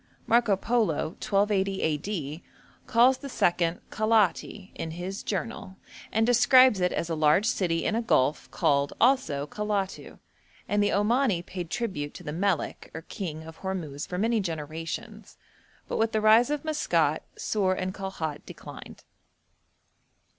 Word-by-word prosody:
Marco 230 -4 +3
Polo, 215 -9 0
1280 195 -1 +1
a.d., 160 0 -3 0.4
calls 250 +2 +4
the 280 - -7
second 175 -6 +1
Calaiati 215 -2 +1
in 160 - -5
his 180 +4 -5
'Journal,' 190 0 -4 0.4
and 220 +1 +2
describes 245 -1 +6
it 180 - +2
as 165 - -2
'a 165 - -2
large 155 +5 +3
city 175 -8 0
in - - +1
a 230 - +1
gulf 150 - +1
called, 140 0 +1
also, 235 - +2
Calatu,' 200 +3 -3 0.5
and 205 0 +1
the 205 - +2
Omani 210 -3 +1
paid 180 -3 -6
tribute 180 -12 -3
to - - -10
the 150 - -5
melek 185 -1 -1
or 160 - -6
king 160 -7 -6
of 160 0 -11
Hormuz 165 -7 -4
for 180 - -4
many 225 +3 +1
generations, 160 -3 -6 0.5
but - - -3
with 225 0 +1
the 220 - +2
rise 220 +4 +6
of 295 0 -2
Maskat, 310 -1 +1 0.2
Sur 195 -3 0
and 185 0 -3
Kalhat 190 -7 -5
declined. - - -11
190 Hz, 145 wpm, -27 LUFS, 165-220 Hz, 0.5 s, describes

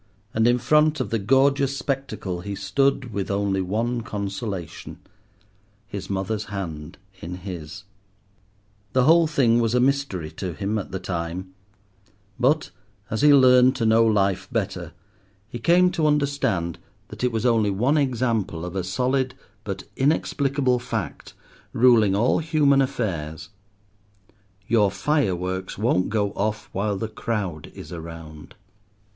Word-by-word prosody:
And 110 +1 +3
in 120 0 +4
front 150 +5 +3
of - - -3
the 115 - +1
gorgeous 135 +5 +2
spectacle 110 -11 -3
he 100 +2 -5
stood 125 +5 0
with 95 -1 -3
only 100 -1 0
one 115 +6 -1
consolation—his 100 0 -8
mother's 100 +2 -2
hand 85 -8 -6 0.2
in 85 +2 -6
his. 90 0 -8 1.1
The 130 - +4
whole 165 +3 +5
thing 125 -6 +3
was 115 0 +1
a - - +4
mystery 125 - 0
to 90 +2 -5
him 105 +4 -2
at 100 - -6
the 95 - -2
time, 90 +1 -4 0.9
but, 140 +5 +2 0.4
as 110 - -1
he 150 0 +7
learned 130 -2 +6
to 115 - -1
know 110 +1 +5
life 100 -4 +1
better, - - -3 0.5
he 120 - -7
came 180 +7 +4
to 155 -3 +1
understand 140 - 0 0.3
that - - -8
it 125 - +2
was 115 +1 -2
only 115 -4 +3
one 125 +10 +2
example 115 - -1
of 90 +1 -7
a 95 - -1
solid 130 +7 0 0.3
but - - -5
inexplicable 140 -2 +1
fact, 115 - -5 0.4
ruling 115 -5 +5
all 115 +5 +2
human 150 -4 +3
affairs—your 100 - -4
fireworks 95 - -1
won't 100 -4 +1
go 105 -2 0
off 105 +1 -3
while 100 +1 -1
the 110 - -3
crowd 105 -8 -4
is - - -9
around. 80 -1 -9
105 Hz, 135 wpm, -24 LUFS, 95-130 Hz, 1.1 s, he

